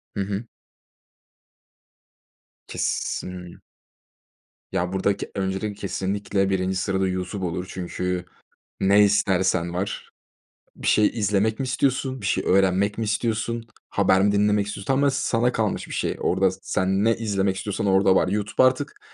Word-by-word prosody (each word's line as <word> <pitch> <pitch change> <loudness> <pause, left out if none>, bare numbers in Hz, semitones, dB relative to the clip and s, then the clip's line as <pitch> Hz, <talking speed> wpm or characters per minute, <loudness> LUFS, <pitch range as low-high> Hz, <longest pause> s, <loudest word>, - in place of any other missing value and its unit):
Hı 100 - -1
hı. 100 +3 -3 2.2
Kesin 90 -1 -3 1.1
Ya, 90 +2 -1
buradak 95 +1 0 0.2
öncelikle 95 +2 -2
kesinlikle 100 0 -1
1'inci 95 0 0
sırada 95 0 0
YouTube 95 +1 -3
olur. 90 +1 -3
Çünkü 90 0 -3 0.5
ne 100 +2 +5
istersen 95 -4 +2
var. 95 +3 -4 0.7
Bir - - -7
şey 105 -1 +5
izlemek 105 0 +1
mi - - 0
istiyorsun, 130 0 0
bir 100 - -4
şey - - 0
öğrenmek 95 +2 +2
mi 115 - 0
istiyorsun, 115 +1 -1 0.2
haber 95 -1 +3
mi 100 +1 +3
dinlemek 105 0 +2
istiyorsun, 100 -1 -6
tamamen 140 +2 +3
sana 125 -2 +1
kalmış 110 -4 -1
bir - - -8
şey. - - -1
Orada 95 +1 +2
sen 95 +2 0
ne 115 0 +3
izlemek 100 -3 0
istiyorsan 105 +2 -3
orada 95 0 +4
var. 95 - +3
YouTube 105 +5 0
artık 130 +3 +1
100 Hz, 135 wpm, -24 LUFS, 95-110 Hz, 2.2 s, ne